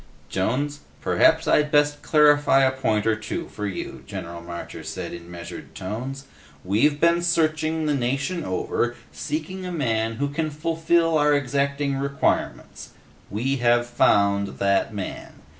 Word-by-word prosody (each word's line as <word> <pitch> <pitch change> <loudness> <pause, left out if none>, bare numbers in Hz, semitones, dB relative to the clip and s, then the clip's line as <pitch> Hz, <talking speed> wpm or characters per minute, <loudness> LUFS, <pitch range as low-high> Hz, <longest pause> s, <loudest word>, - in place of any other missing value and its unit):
"Jones, 140 +10 -1 0.2
perhaps - - +3
I'd 150 0 +3
best 145 -1 +3
clarify 145 -3 +5
a 130 - +4
point 110 -5 0
or 110 -1 +3
two 110 - -5
for 105 -1 -4
you," 95 - -6
General 85 0 -6
Marcher 85 0 -7
said - - -6
in 85 0 -9
measured 85 -1 -9
tones. 125 +8 -5 0.4
"We've 140 +10 +2
been 170 +1 +4
searching 160 -2 +1
the 150 - +1
nation 140 +7 -1
over, 120 +4 -1 0.2
seeking 160 +5 -4
a 180 - -4
man 115 -8 0
who 140 +5 -2
can 155 +2 -2
fulfill 165 +1 +1
our 150 0 +4
exacting 140 0 0
requirements. 140 +1 -2 0.4
We 130 +7 -1
have 120 -1 +3
found 100 -4 +2
that 100 +1 +1
man. 100 -3 -6
140 Hz, 140 wpm, -24 LUFS, 110-150 Hz, 0.4 s, clarify